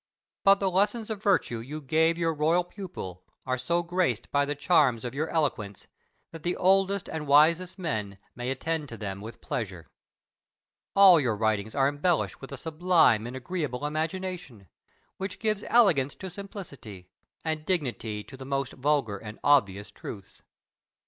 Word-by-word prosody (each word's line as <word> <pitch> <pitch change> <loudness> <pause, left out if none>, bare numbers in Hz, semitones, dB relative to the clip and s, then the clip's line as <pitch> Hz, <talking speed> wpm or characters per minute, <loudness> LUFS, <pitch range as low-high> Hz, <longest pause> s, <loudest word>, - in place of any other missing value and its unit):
But 195 0 +6
the 195 -1 0
lessons 210 +4 +1
of 210 -2 -4
virtue 185 - +1
you 140 +7 -6
gave 160 +3 +2
your 165 -1 +1
royal 160 +4 +2
pupil 175 - -8 0.2
are 130 0 0
so 170 +8 0
graced 170 - -1
by 145 0 +3
the 145 +1 -3
charms 140 -7 +3
of 120 - -4
your 155 +4 -2
eloquence 115 - -2 0.5
that 165 - -9
the 175 +2 -1
oldest 195 +1 +2
and 155 -2 -5
wisest 165 +6 +4
men 110 - -3 0.2
may 120 +1 -4
attend 150 +2 -2
to 115 - -8
them 100 -2 -5
with 110 +3 -9
pleasure. 95 -8 -5 1.0
All 190 -4 +8
your 120 -6 0
writings 110 0 -1
are 135 -1 +3
embellished 145 +4 0
with 135 - -9
a 140 - -6
sublime 160 -8 +3
and 125 - -7
agreeable 145 -1 -3
imagination, 160 - -4 0.5
which 195 0 -4
gives 215 -2 -1
elegance 165 - +4
to 190 -1 -8
simplicity, 140 - -10 0.3
and 155 -1 -1
dignity 125 - -2
to 135 - -12
the 130 - -9
most 135 -1 -2
vulgar 130 -7 0
and 110 +1 -9
obvious 105 -8 +3
truths. 100 -1 -10
150 Hz, 160 wpm, -28 LUFS, 120-180 Hz, 1.0 s, All